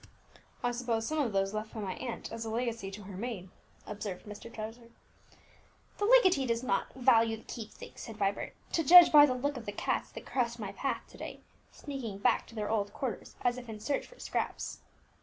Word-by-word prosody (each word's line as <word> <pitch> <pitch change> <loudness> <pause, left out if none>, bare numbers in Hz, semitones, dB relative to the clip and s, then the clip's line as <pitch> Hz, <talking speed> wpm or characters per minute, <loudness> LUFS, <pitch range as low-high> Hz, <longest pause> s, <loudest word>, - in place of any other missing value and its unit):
"I 245 - +2
suppose 235 -2 -1
some 310 +5 -1
of 260 -6 +1
those 195 0 +1
left 215 +1 -4
by - - -4
my 195 -3 -2
aunt 240 +1 -5
as 230 0 -4
a 225 - -4
legacy 230 -3 -2
to 200 +2 -8
her 195 0 -8
maid," 195 -3 -5 0.4
observed 205 -3 -5
Mr. 210 +2 -9
Trevor. 230 +2 -7 1.1
"The 410 - +2
legatee 375 - +6
does 230 +1 0
not 255 - 0
value 230 -3 +4
the 220 - -15
keepsakes," 220 -3 -9
said 225 -2 -8
Vibert, 200 -1 -1 0.2
"to 330 - +1
judge 350 +4 +10
by 295 -1 +9
the 255 - 0
looks 280 +1 -1
of 230 - -12
the - - -1
cats 205 - -1
that - - -8
crossed 235 -2 0
my 205 -4 -5
path 270 +7 -2
to - - -15
day, - - -7 0.3
sneaking 265 -9 -6
back 200 - +2
to 230 - -14
their 210 -1 -2
old 205 -2 0
quarters 250 -7 -4
as 245 0 +2
if 245 -2 -11
in 215 -1 -6
search 275 +6 -1
for - - -17
scraps." - - -3
230 Hz, 210 wpm, -31 LUFS, 210-255 Hz, 1.1 s, judge